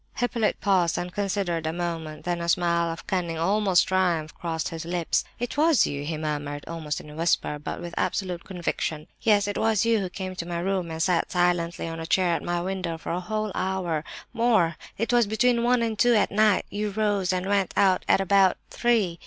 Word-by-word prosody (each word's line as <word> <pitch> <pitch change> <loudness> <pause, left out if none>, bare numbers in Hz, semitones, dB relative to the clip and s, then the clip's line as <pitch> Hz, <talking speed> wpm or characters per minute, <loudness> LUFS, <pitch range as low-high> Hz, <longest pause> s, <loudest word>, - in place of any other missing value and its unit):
Hippolyte 240 -3 0
paused 185 -4 +2
and 180 0 -4
considered 190 -5 -1
a - - 0
moment. 165 -2 -4
Then 175 -1 -1
a 170 - -2
smile 170 -1 +2
of 165 - -8
cunning—almost 180 +2 +1
triumph—crossed 165 -3 -1
his 165 0 -6
lips. 170 0 0
"It 245 +3 -4
was 310 -2 +4
you," 140 0 -3
he 155 +1 -3
murmured, 145 -1 -4
almost 160 -2 -4
in 150 - -11
a - - -11
whisper, 160 -2 0
but 150 - -5
with 175 0 -7
absolute 180 -2 -1
conviction. 170 -4 -3 0.2
"Yes, 205 -2 +3
it 205 - -2
was 220 -1 +2
you 230 -1 +3
who 190 -2 -3
came 185 0 -6
to 170 - -3
my 175 -1 -3
room 185 0 -1
and 160 0 -2
sat 180 -2 +1
silently 175 -2 +1
on 165 0 -5
a 165 - -5
chair 180 -1 +2
at - - -1
my 175 0 -1
window 180 -2 -3
for - - -6
a 175 - -1
whole 215 +3 -3
hour—more! 185 +2 0 0.2
It 230 +3 -1
was 240 -3 +4
between 235 +3 +2
one 245 0 +3
and 220 -2 -2
two 240 -1 +5
at 210 - +2
night; 210 -1 +3
you 210 +1 -2
rose 205 -3 0
and 185 0 -1
went 200 -1 +1
out 190 -2 +4
at - - +4
about 195 0 +4
three. 215 -8 +1
180 Hz, 200 wpm, -26 LUFS, 165-205 Hz, 0.2 s, two